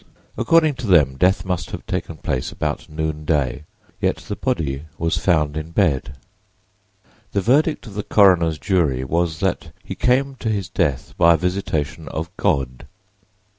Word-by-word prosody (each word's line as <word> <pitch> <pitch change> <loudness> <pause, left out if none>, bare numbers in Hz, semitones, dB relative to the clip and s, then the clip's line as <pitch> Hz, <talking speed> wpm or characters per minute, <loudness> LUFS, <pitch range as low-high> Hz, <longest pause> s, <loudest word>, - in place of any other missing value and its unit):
According 165 -3 +3
to 130 -3 -5
them, 75 -8 +4
death 90 +6 +2
must 90 -3 -2
have - - -7
taken - - -4
place 65 - -2
about - - -3
noonday, 75 -3 -1 0.3
yet - - +1
the - - -6
body 70 -2 -2
was 85 0 0
found 75 -5 +1
in 80 +1 -4
bed. 75 -6 0 1.2
The 100 - +1
verdict 145 - +2
of 105 - -10
the 105 - -3
coroner's 90 -7 +4
jury 75 -6 +1
was 80 +2 -1
that - - -1
he - - -6
"came 135 +2 +1
to 110 - -3
his 100 -4 -2
death 70 -7 -1
by 85 0 +6
a - - 0
visitation 85 -4 -2
of 85 +4 -5
God." 65 -2 -1
85 Hz, 155 wpm, -21 LUFS, 75-100 Hz, 1.2 s, by